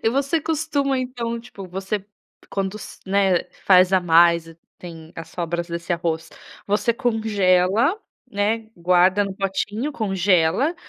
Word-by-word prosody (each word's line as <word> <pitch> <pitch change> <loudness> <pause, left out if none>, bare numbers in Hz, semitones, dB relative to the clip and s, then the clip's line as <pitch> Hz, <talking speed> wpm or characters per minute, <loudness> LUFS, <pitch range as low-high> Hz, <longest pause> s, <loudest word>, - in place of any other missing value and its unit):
E - - +3
você 275 +5 0
costuma 285 -4 -1
então, 240 -2 -3
tipo, 230 -5 -10
você 190 +2 -4 0.5
quando 195 +1 -2
s 215 - -10
né, 190 -2 +2 0.2
faz 185 0 +5
a 190 - +4
mais, 170 -1 +4 0.2
tem 165 -2 -11
as 165 0 -8
sobras 170 0 -3
desse 170 +1 -4
arroz, 165 -1 -2 0.4
você 210 +3 +1
congela, 220 - +1 0.3
né, 220 +2 -1
guarda 180 +3 +3
no 195 -1 -5
potinho, 205 +7 -2
congela, 195 - +1
195 Hz, 130 wpm, -22 LUFS, 175-230 Hz, 0.5 s, faz